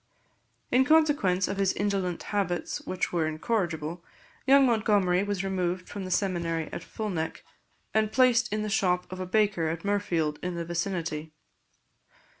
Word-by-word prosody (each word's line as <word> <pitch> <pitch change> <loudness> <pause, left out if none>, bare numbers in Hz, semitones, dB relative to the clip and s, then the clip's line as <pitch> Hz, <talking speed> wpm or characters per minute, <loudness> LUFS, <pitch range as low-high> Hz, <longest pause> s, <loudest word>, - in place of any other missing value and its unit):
In 255 +1 +5
consequence 285 - +3
of 195 - -3
his 195 -1 +2
indolent 195 -4 -1
habits, 185 -5 -1
which 185 - -2
were 165 -2 +1
incorrigible, 170 -1 -2 0.4
young 275 0 +7
Montgomery 205 -6 +3
was 200 -1 -2
removed 185 -1 -2
from 200 -2 -6
the - - -5
seminary 170 -4 -1
at - - -5
Fulneck, 180 -7 -4 0.5
and 215 -1 +2
placed 245 -2 +4
in 215 0 -1
the - - -2
shop 180 -4 +1
of 185 - -6
a 185 - -4
baker 200 -4 +2
at 165 +2 -4
Mirfield, 170 -7 0
in 180 0 -3
the 170 -1 -3
vicinity. 165 -3 -3
185 Hz, 150 wpm, -28 LUFS, 170-210 Hz, 0.5 s, young